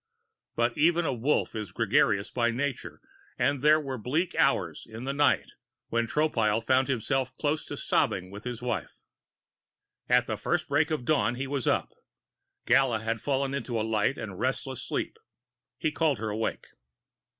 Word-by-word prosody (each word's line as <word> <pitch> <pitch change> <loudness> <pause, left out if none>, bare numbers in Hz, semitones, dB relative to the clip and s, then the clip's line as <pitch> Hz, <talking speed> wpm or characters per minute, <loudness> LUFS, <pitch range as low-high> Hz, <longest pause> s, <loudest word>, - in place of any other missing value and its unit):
But 120 0 +1
even 170 +2 +4
a - - 0
Wolf 130 +5 0
is 105 -5 -5
gregarious 105 -2 +2
by 120 -1 +1
nature 130 +2 -3 0.4
and 135 +2 +1
there 155 +2 +6
were 135 -4 -5
bleak 155 - -1
hours - - +1
in 110 +2 -8
that 135 +1 -2
night 145 +1 +2 0.4
when 115 0 0
Tropile 115 -7 +1
found 130 +2 +3
himself 130 +1 0
close 150 +2 -1
to - - -6
sobbing 90 0 0
with 100 +2 -9
his 125 -1 -5
wife. 125 -2 -3 1.1
At - - +4
the - - -3
first - - -1
break 150 +3 +2
of 155 -6 -2
dawn, 120 -5 +2
he 135 +2 -3
was 135 -2 -2
up. - - +1 0.7
Gala 130 -5 +3
had 115 0 -2
fallen 135 -1 0
into 120 -4 -2
a 110 - 0
light 110 +4 +1
and 100 -4 -6
restless 130 0 -2
sleep; - - -3 0.6
he 155 +4 0
called 150 -3 +1
her 110 +1 -3
awake. 110 +2 -2
130 Hz, 165 wpm, -28 LUFS, 115-145 Hz, 1.1 s, there